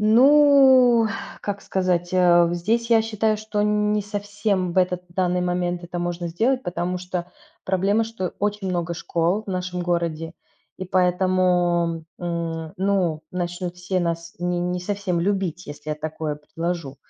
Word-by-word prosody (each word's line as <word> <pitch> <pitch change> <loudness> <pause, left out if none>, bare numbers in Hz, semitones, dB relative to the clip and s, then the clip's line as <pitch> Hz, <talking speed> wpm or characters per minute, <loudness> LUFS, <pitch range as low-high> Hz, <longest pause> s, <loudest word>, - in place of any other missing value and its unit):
Ну 260 0 +6 0.3
как 200 -1 -3
сказать, 180 -2 -1
э, 175 -1 +5
в 170 - -1
здесь 225 +7 0
я 225 -1 +5
считаю, 220 -1 0
что 210 -1 -2
не 210 0 +1
совсем 205 -2 -2
в 185 - +1
этот 180 -1 +1
данный 180 0 0
момент 180 0 -1
это 175 0 -5
можно 175 0 -3
сделать, 250 +10 +1
потому 180 0 -2
что 180 -1 -5 0.3
проблема, 195 +4 +1
что 220 -6 -4
очень 205 -1 -1
много 175 -1 -2
школ 170 +5 0
в - - -5
нашем 180 -1 -3
городе, 170 -1 -2 0.4
и 185 - -4
поэтому 180 -2 +1 0.2
М, 165 -2 -3
ну 185 -5 0
начнут 175 0 -4
все 180 +1 -2
нас 170 -1 -3
ни 175 0 -1
не 180 +1 -1
совсем 195 -2 -2
любить, 190 -2 -1
если 150 +1 -7
я - - 0
такое 155 -1 -4
предложу. 165 -1 -4
180 Hz, 150 wpm, -23 LUFS, 175-205 Hz, 0.4 s, Ну